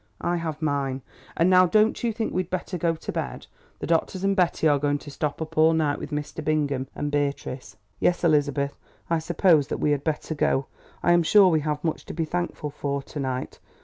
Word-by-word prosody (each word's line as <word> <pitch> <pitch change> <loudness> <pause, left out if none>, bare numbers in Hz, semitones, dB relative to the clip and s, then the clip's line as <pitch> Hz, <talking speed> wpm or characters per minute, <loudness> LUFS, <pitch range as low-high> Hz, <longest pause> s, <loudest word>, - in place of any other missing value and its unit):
I 175 0 0
have 160 -2 -4
mine. 135 -3 -1 0.3
And 165 - +4
now 185 0 +6
don't 215 +6 +2
you 235 - +1
think 220 0 -3
we 185 - +1
had 185 - -9
better 185 0 -3
go 170 -1 0
to - - -6
bed? - - -4 0.3
The - - -5
doctors 170 +3 0
and 195 0 +2
Betty 175 -4 +2
are 145 -2 +3
going 145 0 +1
to 145 0 -10
stop 150 +2 -2
up 160 0 -5
all 160 +1 +6
night 155 -3 +1
with - - -6
Mr. 150 +1 -4
Bingham 145 -4 0
and 145 0 -3
Beatrice." 140 -7 -3 0.2
"Yes, 175 - +1
Elizabeth, 145 -3 +2 0.4
I 165 - +3
suppose 165 -2 +3
that - - -3
we 150 - +1
had 145 -1 0
better 160 0 -2
go. 140 -2 +1 0.4
I 175 - +4
am 175 0 +5
sure 190 +3 +6
we 160 -2 +3
have 150 0 -3
much 160 -2 -2
to - - -7
be 165 0 -1
thankful 175 -3 -3
for 140 0 -3
to 150 - -8
night. 130 -2 -3
155 Hz, 220 wpm, -25 LUFS, 145-175 Hz, 0.4 s, now